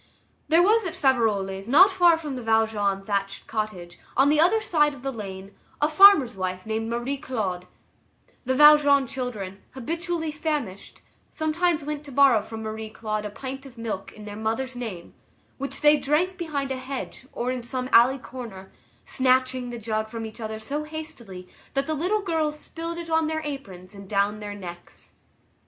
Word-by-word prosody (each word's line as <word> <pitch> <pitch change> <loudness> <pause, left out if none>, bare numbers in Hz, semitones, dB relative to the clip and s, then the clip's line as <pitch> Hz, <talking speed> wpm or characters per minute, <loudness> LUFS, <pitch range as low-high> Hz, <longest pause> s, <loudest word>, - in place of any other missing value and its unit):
There 330 +2 +5
was 440 +4 +4
at 335 - -6
Faverolles, 210 -7 +1
not 375 +9 +7
far 350 -3 +5
from 300 -4 -5
the 250 - -5
Valjean 220 -3 +1
thatched 200 -1 -2
cottage, 210 -6 -5 0.2
on 270 +2 +5
the 300 +1 +3
other 360 +8 +4
side 300 -8 +2
of 255 - -14
the 270 - -2
lane, 195 -3 -8 0.3
a 295 - +3
farmer's 305 - +7
wife 185 -1 -4
named 220 +1 -2
Marie 240 +4 -2
Claude; 200 -10 -3 0.8
the 260 0 0
Valjean 290 -1 +7
children, 215 -7 -5
habitually 330 +4 -3
famished, 295 - -4 0.3
sometimes 320 0 0
went 300 0 -4
to 285 - -10
borrow 265 -4 +5
from 220 +1 -8
Marie 220 0 -5
Claude 215 -1 -4
a - - -7
pint 265 +5 -7
of 250 -2 -16
milk, 220 -4 -5
in 210 - -12
their 205 -1 -7
mother's 225 +4 -2
name, 220 -9 -7 0.5
which 275 +1 -4
they 300 0 +6
drank 310 +7 +1
behind 295 -6 -3
a 265 - -2
hedge 260 0 -6
or 245 +1 -2
in 255 -1 -3
some 255 +1 -2
alley 250 +4 +6
corner, 230 -6 -9 0.3
snatching 255 -1 +1
the 240 - -6
jug 220 -1 -2
from 225 0 -6
each 220 +2 -9
other 220 0 -4
so 285 +7 -4
hastily 240 -12 -8 0.3
that 275 0 +1
the 315 - -2
little 365 +8 0
girls 320 -5 -1
spilled 335 +2 -6
it 335 -1 -6
on 320 -1 +2
their 315 0 -2
aprons 200 -11 -7
and 195 -1 -12
down 205 +1 +1
their 205 -1 -6
necks. 175 -3 -11
255 Hz, 180 wpm, -25 LUFS, 215-300 Hz, 0.8 s, not